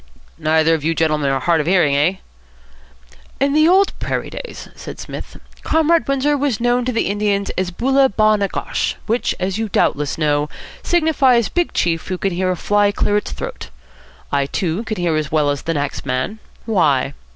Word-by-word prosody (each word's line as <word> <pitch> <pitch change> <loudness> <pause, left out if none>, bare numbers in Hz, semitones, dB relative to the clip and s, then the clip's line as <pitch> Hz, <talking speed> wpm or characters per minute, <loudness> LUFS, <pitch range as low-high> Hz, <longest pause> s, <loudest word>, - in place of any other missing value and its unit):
"Neither 160 +1 +3
of 160 -3 -1
you 165 +1 0
gentlemen 155 -3 +1
are 135 0 +1
hard 165 0 +2
of 150 - -5
hearing, 175 -6 +3
eh?" 155 +7 +2 1.2
"In 275 +1 +2
the 310 +1 +5
old 380 +3 +4
prairie - - -3
days," - - -8
said - - -9
Psmith, - - -8 0.2
"Comrade 320 +1 +2
Windsor 275 +2 +1
was 275 -6 -1
known 245 +1 +1
to 255 - 0
the 230 - 0
Indians 200 -1 0
as 185 -1 -2
Boola 265 +8 +2
Ba 215 0 +3
Na 200 -1 0
Gosh, - - -2
which, 230 +3 0
as 190 +3 -2
you 225 -1 -2
doubtless 145 -6 0
know, 150 -1 +1 0.3
signifies 280 -9 +3
Big 350 -1 0
Chief 165 -2 0
Who 185 - -2
Can 195 +1 -1
Hear 185 +1 0
A 185 - +1
Fly 205 +3 +2
Clear 205 0 0
Its 210 - -3
Throat. - - -6 0.6
I 140 -1 +1
too 175 +6 -2
can 215 -1 -3
hear 175 -3 0
as 155 -2 -2
well 150 -2 +2
as 145 - -3
the 165 - -2
next 145 -1 -3
man. 130 +11 -2 0.3
Why?" 155 - +2
195 Hz, 190 wpm, -19 LUFS, 155-245 Hz, 1.2 s, the